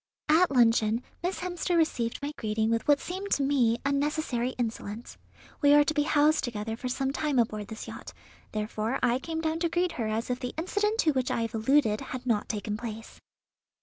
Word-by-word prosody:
At 335 Hz, +4 st, +5 dB
luncheon 230 Hz, -2 st, +3 dB, 0.2 s
Miss 360 Hz, +2 st, -2 dB
Hemster 355 Hz, -1 st, -1 dB
received 255 Hz, -6 st, 0 dB
my 290 Hz, -, -2 dB
greeting 220 Hz, +1 st, -1 dB
with 230 Hz, -1 st, -1 dB
what 290 Hz, -1 st, +5 dB
seemed 380 Hz, +3 st, -5 dB
to 280 Hz, -, +1 dB
me 255 Hz, -5 st, +2 dB
unnecessary 280 Hz, -3 st, 0 dB
insolence. 230 Hz, -1 st, -4 dB, 0.5 s
We 290 Hz, -1 st, +6 dB
are 295 Hz, -, +7 dB
to 300 Hz, -, -1 dB
be 295 Hz, -, +2 dB
housed 300 Hz, +1 st, +3 dB
together 225 Hz, -2 st, -3 dB
for 250 Hz, -, -5 dB
some 270 Hz, +2 st, -1 dB
time 290 Hz, -1 st, -1 dB
aboard 215 Hz, -3 st, 0 dB
this 220 Hz, +1 st, -8 dB
yacht; -, -, -8 dB, 0.4 s
therefore 215 Hz, +3 st, -2 dB
I 245 Hz, +1 st, +3 dB
came 320 Hz, +3 st, -4 dB
down 320 Hz, 0 st, -1 dB
to 340 Hz, 0 st, +1 dB
greet 350 Hz, +1 st, +1 dB
her 230 Hz, -8 st, -3 dB
as 220 Hz, +3 st, -2 dB
if 250 Hz, -, -2 dB
the 250 Hz, -1 st, -5 dB
incident 415 Hz, +6 st, 0 dB
to 315 Hz, -, +3 dB
which 260 Hz, -3 st, -1 dB
I 230 Hz, -, 0 dB
have 230 Hz, -, -4 dB
alluded 225 Hz, -1 st, +2 dB
had 255 Hz, 0 st, -6 dB
not 220 Hz, -4 st, 0 dB
taken 210 Hz, -1 st, -3 dB
place." 225 Hz, -1 st, -8 dB
255 Hz, 200 wpm, -28 LUFS, 225-310 Hz, 0.5 s, are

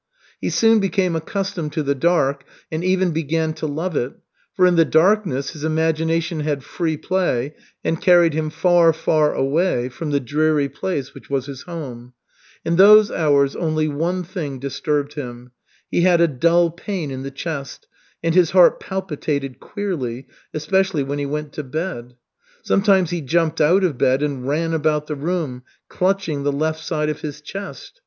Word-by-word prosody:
He -, -, -2 dB
soon 225 Hz, -1 st, +4 dB
became 190 Hz, -3 st, 0 dB
accustomed 165 Hz, -2 st, -3 dB
to 155 Hz, -, -1 dB
the 140 Hz, 0 st, +1 dB
dark 140 Hz, -2 st, +1 dB, 0.3 s
and 160 Hz, +2 st, -3 dB
even 185 Hz, -1 st, +2 dB
began 160 Hz, 0 st, -1 dB
to 155 Hz, 0 st, -4 dB
love 160 Hz, +4 st, -3 dB
it, 125 Hz, +1 st, -1 dB, 0.4 s
for 185 Hz, -, +4 dB
in 180 Hz, -1 st, +4 dB
the 165 Hz, -, +6 dB
darkness 160 Hz, -4 st, +2 dB
his 155 Hz, -3 st, -9 dB
imagination 160 Hz, +1 st, 0 dB
had 145 Hz, -2 st, -2 dB
free 160 Hz, 0 st, -2 dB
play 150 Hz, -6 st, -1 dB, 0.3 s
and 165 Hz, -, -1 dB
carried 175 Hz, -4 st, +5 dB
him 155 Hz, 0 st, -1 dB
far, 165 Hz, +1 st, +4 dB
far 155 Hz, -1 st, +1 dB
away 135 Hz, -2 st, +1 dB
from 155 Hz, +5 st, -6 dB
the 145 Hz, -1 st, +1 dB
dreary 150 Hz, +2 st, +1 dB
place 145 Hz, 0 st, -4 dB
which -, -, -14 dB
was 135 Hz, -2 st, -1 dB
his 135 Hz, -2 st, -8 dB
home. 130 Hz, -8 st, -8 dB, 0.5 s
In 170 Hz, +1 st, +1 dB
those 210 Hz, +2 st, +8 dB
hours 140 Hz, -3 st, +2 dB
only 155 Hz, -2 st, 0 dB
one 170 Hz, +5 st, -1 dB
thing 155 Hz, -6 st, -5 dB
disturbed 145 Hz, +2 st, -2 dB
him. 125 Hz, -4 st, -8 dB, 0.4 s
He -, -, +2 dB
had 175 Hz, -1 st, +4 dB
a 170 Hz, -, +5 dB
dull 170 Hz, +4 st, +2 dB
pain 175 Hz, -3 st, -5 dB
in 130 Hz, 0 st, -5 dB
the 135 Hz, -, -5 dB
chest 140 Hz, 0 st, -6 dB, 0.4 s
and 165 Hz, -1 st, +1 dB
his 175 Hz, -2 st, +4 dB
heart 185 Hz, -2 st, +5 dB
palpitated 150 Hz, -8 st, -4 dB
queerly, 145 Hz, -, -4 dB, 0.3 s
especially 175 Hz, +1 st, 0 dB
when 140 Hz, +1 st, -3 dB
he 140 Hz, -, -2 dB
went 150 Hz, 0 st, -4 dB
to 150 Hz, -, -5 dB
bed. 130 Hz, -4 st, -5 dB, 0.5 s
Sometimes 195 Hz, -4 st, +3 dB
he 175 Hz, -1 st, -2 dB
jumped 160 Hz, +3 st, 0 dB
out 175 Hz, +6 st, +4 dB
of 155 Hz, -9 st, 0 dB
bed 130 Hz, +3 st, +2 dB
and 135 Hz, -3 st, -3 dB
ran 165 Hz, +3 st, 0 dB
about 155 Hz, -1 st, +1 dB
the 150 Hz, -, -4 dB
room, 150 Hz, -4 st, -3 dB, 0.3 s
clutching 185 Hz, -6 st, 0 dB
the 145 Hz, +1 st, 0 dB
left 155 Hz, +2 st, -1 dB
side 155 Hz, -3 st, -1 dB
of 150 Hz, -, -4 dB
his 150 Hz, -1 st, -6 dB
chest. 195 Hz, -, -9 dB
155 Hz, 175 wpm, -21 LUFS, 140-175 Hz, 0.5 s, those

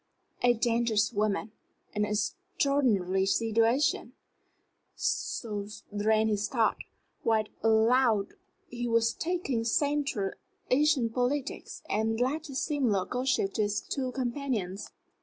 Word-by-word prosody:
"A 245 Hz, 0 st, +5 dB
dangerous 230 Hz, -2 st, +1 dB
woman, 210 Hz, +1 st, 0 dB, 0.4 s
and 210 Hz, -1 st, +1 dB
an -, -, -5 dB
extraordinary 210 Hz, -, +1 dB
situation," 230 Hz, +6 st, +2 dB, 0.8 s
so 295 Hz, -, -2 dB, 0.2 s
ran 215 Hz, +1 st, +2 dB
his 210 Hz, -1 st, 0 dB
thought, 230 Hz, -4 st, +1 dB, 0.4 s
while 220 Hz, -1 st, +2 dB, 0.2 s
aloud 225 Hz, -1 st, +3 dB, 0.4 s
he 240 Hz, 0 st, -4 dB
was 230 Hz, -1 st, +2 dB
talking 325 Hz, -9 st, -1 dB
Central 275 Hz, -5 st, 0 dB, 0.4 s
Asian 280 Hz, -2 st, +4 dB
politics 255 Hz, +4 st, -2 dB
and 220 Hz, +1 st, 0 dB
the 245 Hz, -, +2 dB
latest 280 Hz, 0 st, -2 dB
Simla 245 Hz, -, +1 dB
gossip 250 Hz, -6 st, 0 dB
to -, -, 0 dB
his 205 Hz, 0 st, 0 dB
two 260 Hz, -3 st, -3 dB
companions. 240 Hz, -7 st, -3 dB
230 Hz, 110 wpm, -29 LUFS, 210-270 Hz, 0.8 s, A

